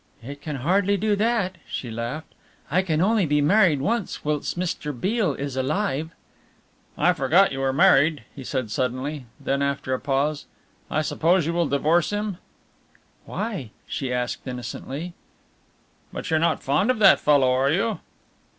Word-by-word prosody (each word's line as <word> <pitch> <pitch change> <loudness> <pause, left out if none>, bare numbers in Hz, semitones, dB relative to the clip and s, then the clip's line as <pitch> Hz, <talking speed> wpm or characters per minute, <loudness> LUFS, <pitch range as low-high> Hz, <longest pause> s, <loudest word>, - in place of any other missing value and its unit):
"It 140 +3 -8
can 150 -1 -4
hardly 190 +9 +2
do 210 +1 +1
that," 205 -4 0
she 120 - -5
laughed, 120 +7 -5 0.4
"I 180 +4 +3
can 160 -4 0
only 205 -2 +3
be 150 0 +2
married 165 -2 +4
once 225 - -2
whilst 150 +2 -1
Mr. 150 -6 -3
Beale 195 - 0
is 140 -1 -4
alive." 150 +2 -1 0.9
"I 175 +3 +4
forgot 170 +7 +3
you 135 - -4
were 135 0 +1
married," 155 -1 +4
he 135 - -8
said 130 -4 -3
suddenly, 130 +3 -2
then 140 0 -1
after 140 -2 -1
a 130 - -1
pause, 145 +2 -1 0.4
"I 155 - 0
suppose 170 +2 +2
you 165 - -1
will 170 -2 +1
divorce 155 +4 +2
him?" 205 -2 -2 0.9
"Why?" 200 - -4 0.2
she 130 -3 -4
asked 125 +1 -3
innocently. 130 +6 -6 1.0
"But - - -6
you're 160 - +3
not 170 +1 +1
fond 145 - +1
of 255 - +2
that 200 -3 +6
fellow, 140 -4 +4
are 130 +2 +2
you?" 200 +7 0
150 Hz, 160 wpm, -24 LUFS, 135-185 Hz, 1.0 s, that